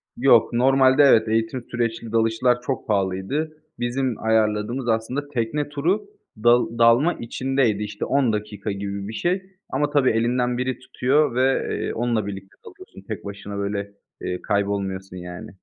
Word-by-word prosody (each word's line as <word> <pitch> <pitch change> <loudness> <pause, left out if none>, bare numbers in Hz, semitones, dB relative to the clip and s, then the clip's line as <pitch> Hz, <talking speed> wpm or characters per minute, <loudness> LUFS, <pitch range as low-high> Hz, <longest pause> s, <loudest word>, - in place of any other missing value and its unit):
Yok. 120 -2 +4
Normalde 130 +3 +5
evet, 110 -5 +5
eğitim 115 +3 0
süreçli 115 -1 -2
dalışlar 115 +2 +2
çok 130 0 -4
pahalıydı. 100 +11 -1 0.2
Bizim 125 +1 -1
ayarladığımız 110 +3 +1
aslında 115 +6 -1
tekne 140 +3 -2
turu, 160 - 0 0.4
dal 120 -1 +4
dalma 120 +9 +5
içindeydi. 120 -3 -1
İşte, 105 0 -4
10 135 -5 +2
dakika 105 -1 -4
gibi 100 0 -4
bir 110 - -6
şey 180 - 0 0.3
ama 145 0 0
tabii, 145 -3 +3
elinden 125 +2 +1
biri 125 0 -2
tutuyor 130 +1 +1
ve, 130 +1 +2
eee, - - -3
onunla 115 -2 0
birlikte 95 -1 -8
dalıyorsun. - - -13
Tek - - -6
başına, 100 0 -7
böyle, 100 0 -3 0.3
eee, 90 - -3
kaybolmuyorsun, 100 -2 -2
yani. 90 0 -8
115 Hz, 145 wpm, -23 LUFS, 105-130 Hz, 0.4 s, Normalde